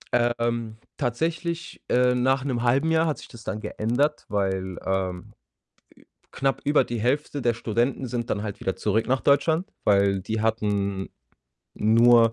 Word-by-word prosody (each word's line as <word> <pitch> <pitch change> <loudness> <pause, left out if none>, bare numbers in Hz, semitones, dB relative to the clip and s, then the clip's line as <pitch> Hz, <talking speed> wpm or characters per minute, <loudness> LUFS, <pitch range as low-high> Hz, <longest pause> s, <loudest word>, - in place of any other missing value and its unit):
Ähm, 120 -2 0 0.2
tatsächlich, 165 +6 -2
äh 125 0 +4
nach 130 +1 +2
'nem 130 -4 -1
1/2 135 +7 +2
Jahr 160 0 +3
hat 155 - -1
sich - - -11
das 115 -2 -12
dann 110 -1 -4
geändert, 125 +10 -1
weil, 95 -2 -1
ähm, 95 -2 -2 1.0
knapp 135 0 -1
über 145 +1 +3
die 120 - -4
Hälfte 140 +3 0
der 120 -1 +2
Studenten 120 +4 -1
sind 120 -1 -3
dann 105 - -1
halt 105 -2 -6
wieder 95 - -2
zurück 110 +2 +1
nach 130 +1 +1
Deutschland, 160 +6 +2 0.2
weil 100 -1 +3
die 110 +4 -3
hatten 100 -3 -1 0.7
nur, 115 +1 +5
120 Hz, 150 wpm, -25 LUFS, 105-135 Hz, 1.0 s, nur